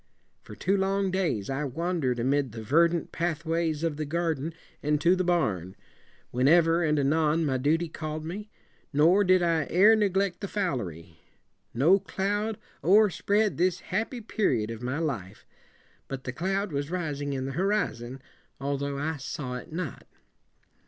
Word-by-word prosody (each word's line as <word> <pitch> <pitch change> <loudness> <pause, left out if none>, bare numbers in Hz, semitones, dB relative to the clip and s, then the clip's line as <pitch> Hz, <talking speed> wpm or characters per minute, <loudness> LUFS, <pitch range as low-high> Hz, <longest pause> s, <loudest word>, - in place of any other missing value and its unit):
For - - -11
two 195 - +1
long 195 0 +1
days 170 - -1
I 135 +2 -2
wan 170 +6 -2
der 130 -4 +1
ed 120 - -7
amid 135 0 +1
the 110 -1 -6
ver 160 +9 +5
dant 170 -1 -3
pathways 165 -1 -1
of 160 -3 -1
the 155 - -2
garden 160 -1 -1 0.3
and 150 0 +1
to 175 +4 +4
the 185 - 0
barn, 105 - 0 0.6
when 125 +2 +2
ever 165 +1 +5
and 150 -1 +2
anon 155 +3 +2
my 135 -3 +1
du 145 +5 +3
ty 170 +1 -3
call 155 -1 -5
ed 155 - -6
me, 200 +6 -6 0.4
nor 165 +7 +5
did 185 -1 +4
I 165 -2 +1
ere 205 +6 +6
neg 205 -3 +1
lect 195 -1 0
the 200 - -3
fowlery. 95 - -3 0.6
No 165 +11 +5
cloud 205 +3 -2 0.3
o'erspread 205 0 +3
this 180 +1 +1
happy 225 +5 -1
peri 200 - 0
od 110 - -5
of 115 0 -7
my 125 +3 -2
life. 115 - -4 0.6
But 135 -1 -6
the 125 - -4
cloud 195 +5 -1
was 145 0 -2
ri 175 -4 -2
sing 145 0 -3
in 130 -1 -3
the 135 - -3
horizon, 135 - -1 0.4
although 140 +1 -2
I 155 +2 -2
saw 135 -1 -5
it 125 - -10
not. 165 -4 -5
160 Hz, 180 wpm, -27 LUFS, 135-185 Hz, 0.6 s, ere